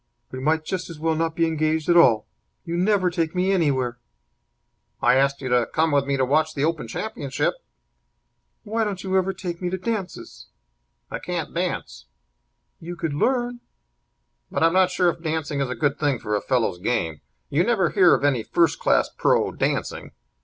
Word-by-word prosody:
"We 130 - -6
might 155 +3 0
just 185 0 -4
as 165 - -8
well 160 +1 0
not 165 0 -1
be 165 - +2
engaged 155 -1 0
at 175 - +4
all. 120 -11 +5 0.4
You 170 -1 -3
never 185 0 +2
take 165 -1 -2
me 185 +2 +1
anywhere." 130 -9 0 1.0
"I 120 - +4
asked 140 +1 +2
you 130 - -3
to 125 -1 +2
come 160 0 +1
with 140 -1 +2
me 140 -1 0
to 130 - +2
watch 155 +4 +1
the 140 0 +1
Open 160 -7 -2
Championship." 140 - -2 1.1
"Why 225 +1 -1
don't 200 -3 -3
you 190 -1 -1
ever 190 0 +2
take 180 -2 -6
me 180 - -1
to 190 - -2
dances?" 200 -1 -5 0.6
"I - - -4
can't - - -4
dance." - - -3 0.7
"You 175 +2 -7
could 165 -3 -3
learn." 245 - 0 0.9
"But - - -1
I'm 165 0 +4
not 185 0 +4
sure 180 -1 +2
if 170 - -12
dancing 155 -3 -2
is 135 - -1
a 130 - -3
good 145 -1 0
thing 145 -3 +1
for 105 - -4
a 105 - -1
fellow's 115 -9 0
game. 85 -7 -1 0.3
You 155 +5 +3
never 195 -6 +1
hear 185 -4 +5
of - - -4
any 140 -5 +2
first 170 +8 +1
class - - +3
pro. - - +2
dancing. - - -2
160 Hz, 190 wpm, -23 LUFS, 140-180 Hz, 1.1 s, all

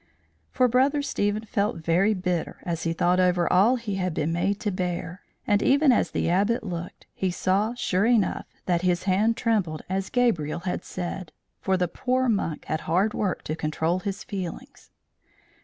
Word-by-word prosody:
For 255 - +3
Brother 270 +4 +2
Stephen 210 -4 -1
felt 205 -1 0
very 175 +6 +2
bitter 180 -3 -2
as 170 -1 -3
he 165 - +1
thought 175 +2 +2
over 180 -1 +3
all 205 +8 +5
he 225 -5 -4
had 185 -3 -2
been 155 +2 0
made 195 +4 0
to 210 - -1
bear; 180 0 -3 0.2
and 205 0 +2
even 280 +1 +4
as 240 - +2
the - - -1
Abbot 200 +7 +2
looked, 175 -2 -6
he 190 - -1
saw, 195 +6 0
sure 200 -3 +1
enough, 230 -5 +1 0.2
that 175 -2 +1
his 180 -1 +1
hand 205 +4 +2
trembled 205 -10 0
as 190 +1 -2
Gabriel 170 - +1
had 180 0 -3
said; 180 -1 -5 0.3
for 190 -1 +1
the 180 -1 +1
poor 255 +8 0
monk 195 -8 -1
had 155 - -2
hard 190 +6 +2
work 190 -5 -2
to 155 - -3
control 160 +3 -1
his 200 0 -4
feelings. 185 -4 -7
185 Hz, 175 wpm, -25 LUFS, 175-215 Hz, 0.3 s, all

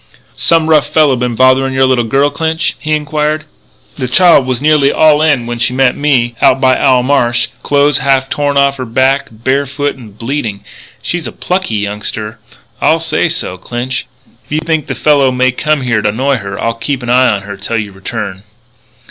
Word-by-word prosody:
"Some 165 -1 +2
rough 155 -3 +3
fellow 150 -4 +3
been 125 -1 -2
bothering 130 +2 +3
your 130 0 +3
little 130 -2 +2
daughter, 140 +5 +1
Clinch?" 160 +2 -1
he 155 0 -2
inquired. 155 0 -1 0.5
"The 130 - -2
child 160 0 +4
was 130 -2 -1
nearly 150 -1 +3
all 155 -1 +4
in 145 -6 +2
when 120 0 -5
she 120 +1 0
met 130 -1 +2
me 130 -5 +1
out 130 - +4
by 130 -1 +3
Owl 130 -2 +3
Marsh 120 -3 +1
clothes 145 -1 +2
half 135 0 +1
torn 145 0 -1
off 140 0 +2
her 130 - -4
back, 130 +4 +1
bare 130 +6 -1
foot 145 +1 -3
and 110 -6 -14
bleeding. 115 -5 -4 0.4
She's 175 -2 -3
a - - -6
plucky 180 - -2
youngster. 105 +2 -4 0.4
I'll 160 - +3
say 165 +1 0
so, 95 - -4
Clinch. 120 +4 -4 0.4
If - - -28
you 150 - 0
think 160 -2 -1
the - - -4
fellow 145 -3 +3
may 130 0 +1
come 150 +3 -1
here 120 -4 0
to 105 - +1
annoy 130 +6 0
her 100 0 -6
I'll 115 - -1
keep 130 +3 -4
an 120 - -2
eye 130 +1 +4
on 100 - -6
her 100 0 -7
till 105 +4 -4
you 105 -2 -4
return." 95 0 -6
130 Hz, 200 wpm, -13 LUFS, 120-145 Hz, 0.5 s, child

